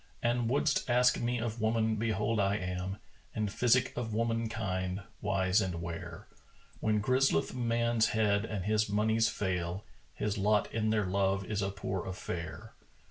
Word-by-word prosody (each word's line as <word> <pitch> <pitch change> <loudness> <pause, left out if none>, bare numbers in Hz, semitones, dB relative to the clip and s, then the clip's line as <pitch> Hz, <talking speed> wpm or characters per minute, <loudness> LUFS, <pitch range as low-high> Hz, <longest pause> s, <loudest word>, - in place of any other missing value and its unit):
An 120 0 +1
would'st 140 +2 +1
ask 125 +1 +4
me 120 +1 0
of 115 -1 -3
woman, 110 0 +2
behold 110 0 0
I 100 0 +2
am 90 0 -3 0.2
* - - -31
In 110 -1 0
physic 125 +4 +2
of 110 -3 -3
womankind 110 -5 -1 0.2
wise 95 0 +2
and 90 -4 -2
ware: 85 0 -6 0.5
When 110 -1 +1
grizzleth 130 -8 +2
man's 115 -2 +1
head 105 -2 +2
and 105 -4 -4
his 110 0 +2
monies 110 +2 +2
fail, 90 0 -2
* - - -32
His 105 0 -2
lot 105 +1 +2
in 110 -1 0
their 105 -2 +2
love 95 +1 +1
is 105 0 -2
a 95 - 0
poor 95 -1 -3
affair." 85 -4 -6
105 Hz, 160 wpm, -31 LUFS, 95-115 Hz, 0.5 s, ask